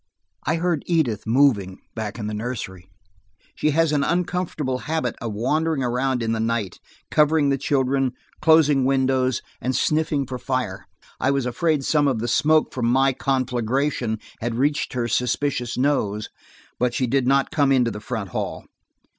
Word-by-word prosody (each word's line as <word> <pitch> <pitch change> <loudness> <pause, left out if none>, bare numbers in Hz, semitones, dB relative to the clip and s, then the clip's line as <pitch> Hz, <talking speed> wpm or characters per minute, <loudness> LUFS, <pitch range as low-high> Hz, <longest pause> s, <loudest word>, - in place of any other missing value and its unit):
I 155 - +2
heard 170 -2 0
Edith 135 - 0
moving 110 -7 +3 0.2
back 110 -1 -5
in 110 - -5
the 105 - -3
nursery: 105 -5 -5 0.6
she 155 - 0
has 160 +1 +2
an 145 -2 +2
uncomfortable 170 -6 -1
habit 155 -6 -2
of 115 -1 -3
wandering 150 +6 0
around 125 0 0
in 115 - 0
the 115 - -1
night, 110 -4 -2 0.3
covering 150 -1 +3
the 140 - +2
children, 135 -1 +1 0.3
closing 150 -3 +5
windows, 130 -1 +1 0.2
and 130 +1 -1
sniffing 155 -2 +1
for 125 -1 -6
fire. 125 -8 -3 0.3
I 130 - +1
was 140 -2 +1
afraid 145 +4 0
some 150 -2 +3
of 130 -4 +1
the 115 +2 -2
smoke 155 +6 +3
from 120 -2 -1
my 135 +2 +3
conflagration 130 -2 -1 0.2
had 115 0 -2
reached 145 +4 0
her 120 -2 -1
suspicious 125 0 -1
nose, 110 -6 0 0.5
but 125 0 +1
she 130 - +1
did 130 +1 +1
not 135 0 +2
come 140 -3 +2
into 125 -3 +3
the 105 0 -7
front 110 -4 -4
hall. - - -4
130 Hz, 165 wpm, -23 LUFS, 120-145 Hz, 0.6 s, closing